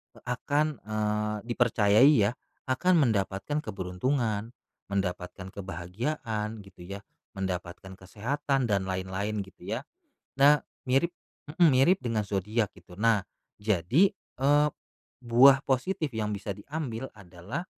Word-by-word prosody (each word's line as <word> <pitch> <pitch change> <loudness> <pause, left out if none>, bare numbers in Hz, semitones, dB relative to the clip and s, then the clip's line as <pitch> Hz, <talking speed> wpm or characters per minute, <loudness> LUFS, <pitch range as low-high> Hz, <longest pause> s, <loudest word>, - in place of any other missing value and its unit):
eee, - - -17
akan, 145 +4 0
eee, 105 0 -1
dipercayai 120 +2 +5 0.2
ya, - - -3 0.4
akan 155 +8 +3 0.2
mendapatkan 100 +6 -1
keberuntungan, 110 +4 -2 0.4
mendapatkan 95 -1 -3
kebahagiaan 105 - -4
gitu 95 - -16
ya, 100 +1 -6 0.4
mendapatkan 95 0 -4
kesehatan, 135 +8 -1
dan 100 -2 +1
lain-lain 95 +3 -2
gitu 95 -2 -16
ya, 115 +4 -2 0.6
nah 145 +1 +6 0.3
mirip 135 +7 +2 0.5
mhm, 175 -2 +7
mirip 150 +9 +5
dengan 115 -3 0
zodiak 105 +3 0
gitu, 90 -2 -17
nah 110 -2 +3 0.4
jadi, 105 - +3
eee, 145 -4 +2 0.5
buah 130 +3 +6
positif 145 +4 0
yang 110 -1 -1
bisa 100 0 -5
diambil 130 +1 -5
adalah, 95 - -7
110 Hz, 115 wpm, -28 LUFS, 95-135 Hz, 0.6 s, mhm